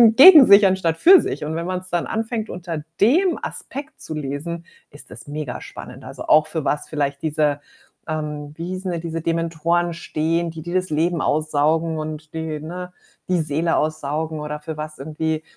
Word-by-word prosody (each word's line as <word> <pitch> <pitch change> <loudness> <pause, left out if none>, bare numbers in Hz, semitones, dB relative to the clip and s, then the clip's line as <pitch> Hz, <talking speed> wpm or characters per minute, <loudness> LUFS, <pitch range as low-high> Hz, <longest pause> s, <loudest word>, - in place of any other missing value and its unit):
gegen 300 -1 +10
sich 200 0 +8
anstatt 185 -4 +1
für 370 - +8
sich - - -4
und 160 +1 -3
wenn 170 +1 -3
man's 185 0 -4
dann 175 -1 -1
anfängt, 225 0 -3
unter 170 -3 -5 0.2
dem 340 - +4
Aspekt 285 +3 -6
zu 155 - -4
lesen, 145 -1 -3 0.5
ist 145 - -12
das - - -6
mega 145 -4 -5
spannend. - - -10
Also, - - -8
auch 155 0 +6
für 160 -3 -3
was 150 - -1
vielleicht 140 -2 -2
diese 150 -2 +1 0.5
ähm, 150 -1 -4
wie 170 +1 -5
hießen 185 0 -4
denn 170 -1 -3
diese 165 -1 -4
Dementoren 170 +1 0
stehen, 165 +1 -1
die 160 -1 -8
die 175 +1 -6
das 185 -1 0
Leben 165 +2 +1
aussaugen 155 +2 +1
und 155 0 -6
die, 160 -2 -4
ne, 180 +3 -7 0.4
die 180 -3 +2
Seele 160 +2 0
aussaugen 155 +1 -2
oder 150 0 -5
für 155 0 -6
was 155 0 -6
irgendwie, 155 +2 -3
160 Hz, 180 wpm, -21 LUFS, 155-175 Hz, 0.5 s, gegen